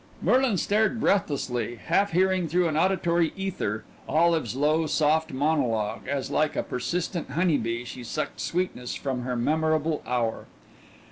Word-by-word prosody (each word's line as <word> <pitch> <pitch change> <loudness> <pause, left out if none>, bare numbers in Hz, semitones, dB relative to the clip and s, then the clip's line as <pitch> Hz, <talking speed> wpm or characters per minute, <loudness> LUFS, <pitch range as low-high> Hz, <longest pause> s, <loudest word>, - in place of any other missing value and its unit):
Merlin 255 -5 +3
stared 215 +5 +1
breathlessly, 130 - 0
half 195 +10 +1
hearing 185 0 +2
through 175 +2 +2
an 155 - -1
auditory 170 -1 +2
ether 175 - -3 0.3
Olive's 165 -3 +2
low, 155 +3 +2
soft 155 +1 +2
monologue, 130 -8 0
as 135 0 -2
like 155 +1 +1
a - - 0
persistent 170 +6 -3
honey 165 +2 +2
bee 115 +2 -3
she 125 +1 -8
sucked 150 +6 -4
sweetness 170 -9 -2
from 130 -3 -3
her 125 0 -3
memorable 155 +4 +1
hour. 120 -2 -1
155 Hz, 140 wpm, -26 LUFS, 125-175 Hz, 0.3 s, Merlin